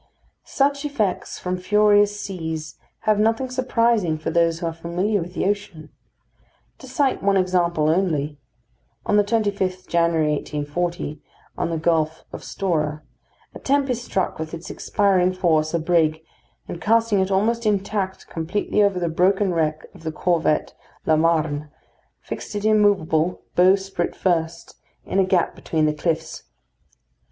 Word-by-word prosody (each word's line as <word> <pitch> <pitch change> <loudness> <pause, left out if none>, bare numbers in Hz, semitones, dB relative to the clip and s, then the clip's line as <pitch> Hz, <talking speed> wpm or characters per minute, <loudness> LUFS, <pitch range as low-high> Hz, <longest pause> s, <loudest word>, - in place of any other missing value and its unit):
Such 280 +1 +1
effects 225 -11 -2
from 180 0 -3
furious 205 +2 +3
seas 160 -6 -5 0.2
have 215 -1 +2
nothing 225 +4 +1
surprising 230 -9 +1
for 155 - -3
those 170 -1 +2
who 170 - -5
are 165 - -2
familiar 175 +5 -1
with 175 +2 -8
the - - -1
ocean. 190 -6 -3 0.9
To - - -11
cite 280 -4 0
one 195 0 +3
example 175 -4 +1
only: 155 -4 0 0.7
On 210 - +1
the 205 - +5
25th 200 -4 -1
January 170 -2 +2
1840, 150 +1 -3 0.4
in - - 0
the 165 - -1
Gulf 160 -1 0
of - - -7
Stora, 155 -5 -2 0.5
a - - -9
tempest 270 -3 0
struck 190 -8 -2
with 160 +1 -4
its 165 - -8
expiring 190 -3 +1
force 160 -4 +1
a 170 - +1
brig, 160 -1 +1 0.4
and 170 - -7
casting 225 +1 +3
it 190 0 +1
almost 220 +4 +1
intact 200 -1 -1
completely 175 +6 -1
over 200 -3 +2
the 175 - -1
broken 185 +3 +2
wreck 155 -2 -1
of 190 - -15
the 160 -1 -4
corvette 160 -2 0 0.3
La 155 - +4
Marne, 155 -2 +1 0.5
fixed - - -7
it 205 0 -3
immovable, 195 -6 +2
bowsprit 190 -1 +2
first, 165 -2 -1 0.3
in 195 - 0
a - - +5
gap 185 -2 +1
between 155 -2 -1
the 150 - +2
cliffs. 160 +1 -2
180 Hz, 145 wpm, -22 LUFS, 160-205 Hz, 0.9 s, the